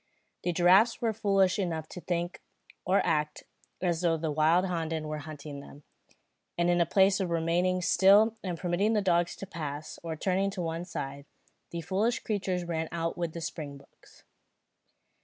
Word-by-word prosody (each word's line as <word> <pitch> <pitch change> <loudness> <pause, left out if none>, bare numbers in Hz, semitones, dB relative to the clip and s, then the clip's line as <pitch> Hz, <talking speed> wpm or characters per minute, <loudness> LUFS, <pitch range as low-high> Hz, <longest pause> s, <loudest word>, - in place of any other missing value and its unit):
The 175 - 0
giraffes 185 +7 +5
were 225 -2 0
foolish 195 -2 +2
enough 165 -5 -2
to 180 - -8
think, 175 0 -3 0.4
or 190 +2 +2
act, 150 0 0 0.4
as 170 -2 +1
though 165 -2 +2
the 160 -1 -2
wilde 160 +5 +3
honden 165 -3 -2
were 155 0 -4
hunting 150 -1 -8
them; 145 +1 -13 0.7
and 175 0 +2
in 175 0 +4
place 190 +2 +4
of 190 -2 -1
remaining 175 +2 +1
still 200 +6 +5
and 180 -3 -3
permitting 185 +6 +1
the 210 -2 +1
dogs 175 -2 +2
to - - -7
pass, 155 -4 -6
or 165 -1 -4
turning 190 +4 0
to 190 -2 -5
one 165 +1 -3
side, 140 -4 -6 0.4
the 170 - -5
foolish 200 +8 0
creatures 190 -4 -2
ran 160 -1 -2
on 165 0 -2
with 170 -2 -3
the 170 - -6
springboks. 140 -4 -9
175 Hz, 165 wpm, -29 LUFS, 160-190 Hz, 0.7 s, giraffes